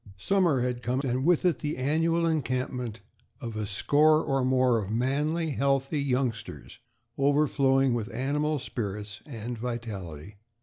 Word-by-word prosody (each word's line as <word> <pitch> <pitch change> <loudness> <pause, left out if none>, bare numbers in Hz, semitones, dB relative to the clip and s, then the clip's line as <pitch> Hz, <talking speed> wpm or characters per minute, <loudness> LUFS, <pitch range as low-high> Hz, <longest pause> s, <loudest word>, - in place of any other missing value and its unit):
Summer 170 - +2
had 125 -1 -2
come 125 +2 -1
and 130 0 -1
with 175 0 +3
it 175 - +2
the 150 0 -3
annual 165 +5 +1
encampment 125 -7 -2 0.4
of 115 -5 -6
a 105 -1 -3
score 155 +9 +3
or 135 -1 0
more 130 -2 +3
of 100 -2 -5
manly, 145 +8 0
healthy 140 +1 0
youngsters, 125 -4 -3 0.4
overflowing 135 -2 +3
with 120 -1 -3
animal 150 +4 0
spirits 105 -6 -5
and 120 -3 -5
vitality. 105 -7 -6
130 Hz, 135 wpm, -28 LUFS, 115-150 Hz, 0.4 s, with